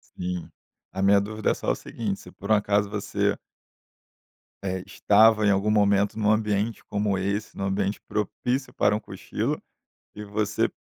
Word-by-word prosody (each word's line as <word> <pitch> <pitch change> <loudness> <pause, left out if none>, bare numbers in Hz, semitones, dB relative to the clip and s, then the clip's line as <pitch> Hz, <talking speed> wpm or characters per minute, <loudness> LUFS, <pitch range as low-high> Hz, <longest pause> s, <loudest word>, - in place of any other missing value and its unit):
Sim, 90 -1 -4 0.4
a 95 - -4
minha 100 +1 +5
dúvida 110 +1 -1
é - - +2
só - - -1
o - - 0
seguinte 105 -4 -4
se 90 - -13
por 100 +2 -6
um 110 - +7
acaso 100 0 +1
você 105 -1 -1 1.3
É, 95 -1 -2
estava 105 +2 +4
em 100 - +5
algum 100 +2 +1
momento 100 0 +3
num 105 0 +3
ambiente 110 0 0
como 105 -1 0
esse, 100 +3 -2
num 95 - -3
ambiente 100 +1 -1
propício 125 +5 -2
para 105 - +3
um 105 - -1
cochilo - - -3 0.5
e 105 - -7
você 105 +1 0
105 Hz, 165 wpm, -26 LUFS, 100-105 Hz, 1.3 s, um